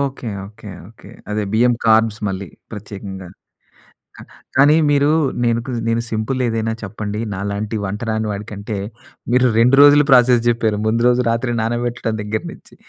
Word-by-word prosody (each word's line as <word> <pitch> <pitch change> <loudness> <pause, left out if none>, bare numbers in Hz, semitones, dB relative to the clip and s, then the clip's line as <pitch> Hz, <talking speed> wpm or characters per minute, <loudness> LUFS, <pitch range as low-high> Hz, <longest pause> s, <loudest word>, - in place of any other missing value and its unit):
Okay, 135 -3 -3 0.2
okay, 105 0 -13 0.2
okay. 110 - -16 0.2
అదే 105 0 -1
బియ్యం 120 +2 +4
carbs 110 -1 +3
మళ్ళీ 95 -1 -5 0.2
ప్రత్యేకంగా. 100 -2 -8 0.9
కా - - -11 0.3
కానీ 145 +3 +6 0.2
మీరు 145 0 +3 0.4
నేనుకొ 115 +2 -1 0.2
నేను 115 0 0
సింపుల్ 110 +4 -2
ఏదైనా 115 -1 -1
చెప్పండి 105 +1 -5
నాలాంటి 100 +3 -3
వంట 100 +2 -4
రాని 110 0 -1
వాడి 100 +1 -5
కంటే, 105 +1 -5 0.6
మీరు 125 0 +4
రెండు 125 +4 +5
రోజులు 145 0 +7
ప్రాసెస్ 125 -2 +5
జెప్పారు. 115 -3 +1
ముందు 115 +1 +1
రోజు 125 0 +2
రాత్రి 115 +2 -1
నానబెట్టడం 120 0 -2
దగ్గర 110 +1 -3
నుంచి, - - -17
115 Hz, 150 wpm, -19 LUFS, 105-120 Hz, 0.9 s, రోజులు